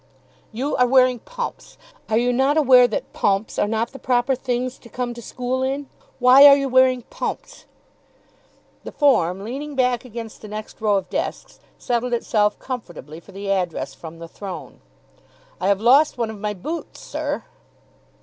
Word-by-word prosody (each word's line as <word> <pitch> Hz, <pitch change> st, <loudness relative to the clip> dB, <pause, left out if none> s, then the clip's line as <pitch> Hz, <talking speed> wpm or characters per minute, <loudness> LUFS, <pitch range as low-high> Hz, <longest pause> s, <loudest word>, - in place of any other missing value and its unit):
"You 260 Hz, +6 st, -2 dB
are 250 Hz, -1 st, +4 dB
wearing 255 Hz, -1 st, +4 dB
pumps? -, -, -7 dB, 0.3 s
Are 220 Hz, -, +2 dB
you 245 Hz, +1 st, +2 dB
not 270 Hz, +4 st, +2 dB
aware 255 Hz, -4 st, +6 dB
that 220 Hz, -, -5 dB
PUMPS 200 Hz, +2 st, 0 dB
are -, -, +2 dB
not 225 Hz, +2 st, -1 dB
the 270 Hz, -, -11 dB
proper 245 Hz, +1 st, +1 dB
things 255 Hz, 0 st, -3 dB
to 235 Hz, -, -15 dB
come 245 Hz, +1 st, -3 dB
to 235 Hz, -, -10 dB
school 250 Hz, +2 st, -3 dB
in? 270 Hz, +2 st, -2 dB, 0.3 s
Why 260 Hz, +3 st, +8 dB
are 280 Hz, -, +9 dB
you 275 Hz, -1 st, -1 dB
wearing 255 Hz, -1 st, +4 dB
PUMPS?" -, -, -6 dB, 1.2 s
The -, -, -7 dB
form, 195 Hz, -, +2 dB
leaning 280 Hz, +6 st, -6 dB
back 250 Hz, -2 st, +1 dB
against 230 Hz, -2 st, -8 dB
the 215 Hz, -, -9 dB
next 215 Hz, +1 st, -8 dB
row 210 Hz, -2 st, +3 dB
of 190 Hz, -1 st, -4 dB
desks, -, -, -4 dB, 0.2 s
settled 245 Hz, 0 st, -1 dB
itself 210 Hz, -3 st, +1 dB
comfortably 175 Hz, -, -7 dB
for 185 Hz, -, -17 dB
the 195 Hz, +1 st, -4 dB
address 180 Hz, -4 st, -2 dB
from 165 Hz, 0 st, -10 dB
the 165 Hz, 0 st, -9 dB
throne. 190 Hz, +1 st, -9 dB, 0.8 s
"I 185 Hz, -, -1 dB
have 200 Hz, -1 st, +3 dB
lost 270 Hz, +7 st, +4 dB
one 230 Hz, -2 st, -1 dB
of 215 Hz, -, -10 dB
my 210 Hz, 0 st, -3 dB
boots, 315 Hz, -, -6 dB
sir." -, -, -4 dB
245 Hz, 170 wpm, -22 LUFS, 210-260 Hz, 1.2 s, are